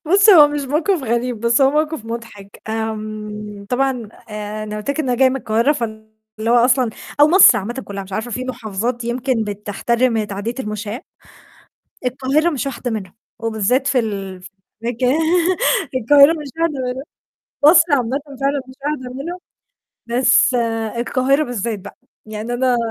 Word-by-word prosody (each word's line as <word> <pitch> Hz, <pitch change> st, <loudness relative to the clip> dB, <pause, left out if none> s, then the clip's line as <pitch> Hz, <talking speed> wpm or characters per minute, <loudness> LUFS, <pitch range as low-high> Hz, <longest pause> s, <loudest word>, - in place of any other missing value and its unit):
بُص، 395 Hz, +5 st, +4 dB
هو 300 Hz, -6 st, +8 dB
مش 295 Hz, 0 st, -3 dB
موقف 305 Hz, +5 st, 0 dB
غريب، 235 Hz, -1 st, -1 dB
بس 235 Hz, +3 st, +2 dB
هو 270 Hz, 0 st, +5 dB
موقف 305 Hz, -4 st, -1 dB
مضحك. 225 Hz, -4 st, -9 dB
آمم، 215 Hz, -2 st, -5 dB
طبعًا 270 Hz, +2 st, +1 dB, 0.4 s
أنا 210 Hz, 0 st, -5 dB
قُلت 210 Hz, +6 st, -3 dB
لك 300 Hz, -, -2 dB
إن 280 Hz, -, -2 dB
أنا 245 Hz, -1 st, 0 dB
جاية 265 Hz, -1 st, +6 dB
من 260 Hz, -, -2 dB
القاهرة 230 Hz, +2 st, +1 dB
فاللي 220 Hz, -5 st, -5 dB, 0.4 s
هو 240 Hz, -, +5 dB
أصلًا 245 Hz, 0 st, +3 dB, 0.3 s
أو 295 Hz, -, +7 dB
مصر 375 Hz, +3 st, +7 dB
عامةً 215 Hz, +4 st, -5 dB
كُلّها 200 Hz, -1 st, -6 dB
مش 190 Hz, 0 st, -13 dB
عارفة 220 Hz, +4 st, -3 dB
في 250 Hz, +3 st, -3 dB
محافظات 235 Hz, 0 st, -3 dB
يمكن 240 Hz, -1 st, -1 dB
بتحترم 215 Hz, +3 st, -1 dB
تعدية 205 Hz, +3 st, -4 dB
المشاة. 210 Hz, +1 st, -5 dB, 1.1 s
القاهرة 270 Hz, +6 st, +1 dB
مش 280 Hz, -6 st, -3 dB
واحدة 255 Hz, -2 st, -4 dB
منهم، 195 Hz, -5 st, -5 dB, 0.3 s
وبالذات 230 Hz, +4 st, 0 dB
في 260 Hz, -, +2 dB
ال 195 Hz, -5 st, -4 dB
في 180 Hz, -, -11 dB, 0.3 s
مكا 240 Hz, +2 st, -1 dB, 0.9 s
القاهرة 280 Hz, +5 st, +6 dB
مش 300 Hz, -4 st, -6 dB
واحدة 330 Hz, -2 st, +1 dB, 0.2 s
منهم. 260 Hz, +2 st, -6 dB, 0.6 s
مصر 320 Hz, +3 st, +8 dB
عامةً 265 Hz, 0 st, +1 dB, 0.2 s
فعلًا 280 Hz, 0 st, +1 dB
مش 260 Hz, -, -12 dB
واحدة 260 Hz, -4 st, -3 dB
منهم، 335 Hz, +7 st, -5 dB, 0.7 s
بس 240 Hz, +1 st, +3 dB, 0.4 s
القاهرة 260 Hz, +4 st, +1 dB
بالذات 230 Hz, -4 st, -3 dB
بقى، 200 Hz, +1 st, -12 dB, 0.3 s
يعني 215 Hz, +2 st, -5 dB
أنا 250 Hz, 0 st, +2 dB
240 Hz, 155 wpm, -19 LUFS, 215-270 Hz, 1.1 s, هو